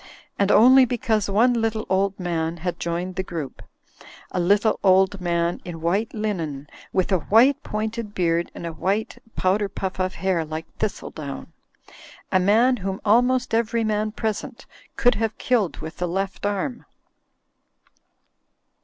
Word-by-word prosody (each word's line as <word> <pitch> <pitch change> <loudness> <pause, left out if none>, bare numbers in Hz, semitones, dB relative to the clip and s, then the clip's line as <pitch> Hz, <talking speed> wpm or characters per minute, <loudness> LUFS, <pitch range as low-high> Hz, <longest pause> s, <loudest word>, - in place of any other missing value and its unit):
And 200 0 +3
only 260 +4 +7
because 225 -4 0
one 230 +5 +4
little 225 -2 -1
old 195 +1 0
man 170 -2 -2
had 175 +1 -4
joined 175 +2 -3
the - - +1
group; 165 -7 -6 0.7
a - - -2
little 205 +5 +2
old 190 0 +4
man 170 -1 0
in 170 -2 -7
white 190 +7 0
linen 170 -10 -3 0.3
with 185 +1 0
a 185 - +3
white 245 - +4
pointed 215 0 -4
beard 170 -1 0
and - - -7
a 165 - -4
white 195 +7 -2 0.2
powder 195 +2 +1
puff 190 -1 -5
of 185 0 -1
hair 185 -2 0
like 155 +1 -6
thistledown: 155 -9 -5 0.8
a 185 - +4
man 225 +7 +4
whom 195 -1 -4
almost 245 +3 +3
ev 230 0 +1
ery 230 - +2
man 215 0 0
present 220 -1 -4 0.3
could 245 -1 +4
have 220 -1 -2
killed 225 -8 +1
iw^itl^ 165 +2 -5
Ji^ft 195 +1 -2
arm. 220 +5 -3
195 Hz, 145 wpm, -23 LUFS, 175-220 Hz, 0.8 s, only